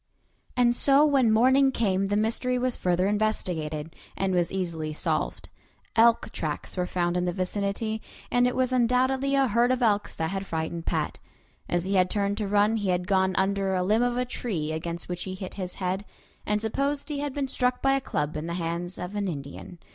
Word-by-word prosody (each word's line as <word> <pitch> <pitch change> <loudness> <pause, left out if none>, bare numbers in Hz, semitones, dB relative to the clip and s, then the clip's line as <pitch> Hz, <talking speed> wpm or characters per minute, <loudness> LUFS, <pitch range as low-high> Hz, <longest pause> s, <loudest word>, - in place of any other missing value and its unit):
And 240 -1 +4
so 280 +3 +5
when 270 -6 +4
morning 260 +5 +5
came 195 -5 +1
the 205 +1 +1
mystery 235 +4 0
was 250 0 0
further 180 0 +1
investigated, 170 -7 -1 0.2
and 190 -1 0
was 175 -1 +1
easily 165 -5 -3
solved. - - -2 0.5
Elk 230 -1 +4
tracks 150 -2 -4
were 180 -1 -1
found 175 -1 0
in 180 0 +1
the 175 - 0
vicinity, 200 +4 -2 0.3
and 245 0 +4
it 250 - -1
was 255 0 +1
undoubtedly 260 +3 +2
a 275 0 +4
herd 235 +2 +3
of 255 -1 +1
elks 205 -3 +1
that 160 +1 -2
had 195 0 -4
frightened 165 +1 -3
Pat. - - -1 0.5
As 175 0 0
he 195 - -1
had 185 -1 +3
turned 200 0 0
to 210 - -1
run 205 +2 +3
he 205 -3 -1
had 180 0 0
gone 190 -1 +2
under 195 0 +1
a 180 - +1
limb 215 +5 +2
of 245 0 +1
a 250 - +1
tree 185 -11 -3
against 170 +2 -4
which 175 -1 -4
he 185 -1 -5
hit 185 -1 -7
his 185 -2 -5
head, 190 +1 -2 0.4
and 210 0 +1
supposed 275 +6 -1
he 290 -2 -2
had 285 -2 -3
been 280 -2 -1
struck 250 -1 0
by 270 0 +4
a 275 - +1
club 150 - -2
in 155 +2 -4
the 170 - -3
hands 175 +1 -3
of 180 +3 -6
an 205 -1 -1
Indian. 145 +2 -7
200 Hz, 210 wpm, -27 LUFS, 180-245 Hz, 0.5 s, so